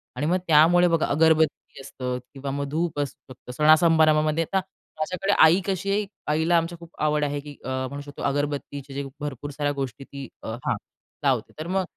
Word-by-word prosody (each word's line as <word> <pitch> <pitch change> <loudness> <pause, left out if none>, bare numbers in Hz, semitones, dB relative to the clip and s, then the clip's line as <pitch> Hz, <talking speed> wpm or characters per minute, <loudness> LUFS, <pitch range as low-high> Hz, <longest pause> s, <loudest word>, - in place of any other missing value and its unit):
आणि 135 +4 -2
मग 175 +4 +2
त्यामुळे 165 +3 +6
बघा 165 -2 +2
अगरबत्ती 160 -2 +2
असतं 125 -1 -4 0.2
किंवा 135 0 -5
मग 140 +1 -2
धूप 160 0 -1
असू 145 -2 -2 0.2
शकतं, 125 - -12
सणा 150 +5 0
सणासमारंभामध्ये. 155 -1 +3
आता 190 +4 0 0.4
माझ्याकडे 185 +5 0
आई 165 +4 +5
कशी 195 0 -1
आहे, 205 +1 +1 0.3
आईला 160 +3 +3
आमची 165 +1 -1
खूप 170 -1 -12
आवड 150 0 +2
आहे 145 0 -1
की 145 0 -10
अ, - - -4 0.2
म्हणू 140 +2 -6
शकतो 145 0 -10
अगरबत्तीचे 145 -1 -2
जे 140 +1 -3 0.2
भरपूर 145 -1 -5
साऱ्या 145 +1 -1
गोष्टी 135 0 -5
ती 140 -1 -8 0.2
हां, 115 +3 -2 0.5
लावते. - - +1
तर 155 - -4
मग 190 +1 0
150 Hz, 185 wpm, -25 LUFS, 140-165 Hz, 0.5 s, त्यामुळे